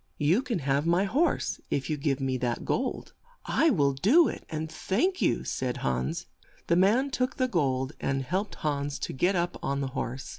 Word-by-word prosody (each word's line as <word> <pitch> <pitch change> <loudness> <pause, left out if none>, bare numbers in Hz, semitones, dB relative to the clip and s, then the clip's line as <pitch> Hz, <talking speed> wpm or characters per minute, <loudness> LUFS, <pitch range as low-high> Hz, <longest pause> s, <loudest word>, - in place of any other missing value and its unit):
You 165 - +3
can 245 -5 -2
have 140 +3 +1
my 175 +3 +3
horse 275 - 0
if 135 -1 -1
you 155 - 0
give 140 -2 -1
me 135 -1 -1
that 120 -1 -2
gold." 260 0 -2 0.3
"I 325 - +3
will 145 - +3
do 235 - +5
it, - - -6
and 155 0 -3
thank 225 - -1
you," - - +2
said 125 -1 -2
Hans. 65 0 -1 0.4
The 170 - +2
man 220 +10 +3
took 255 0 -1
the 255 -2 +2
gold, 135 - 0
and 135 0 -1
helped 190 +9 -2
Hans 145 -1 -2
to - - -4
get 180 +8 +1
up 175 0 -1
on 140 +1 -1
the 135 - -2
horse. 130 -1 -4
155 Hz, 195 wpm, -28 LUFS, 135-205 Hz, 0.4 s, do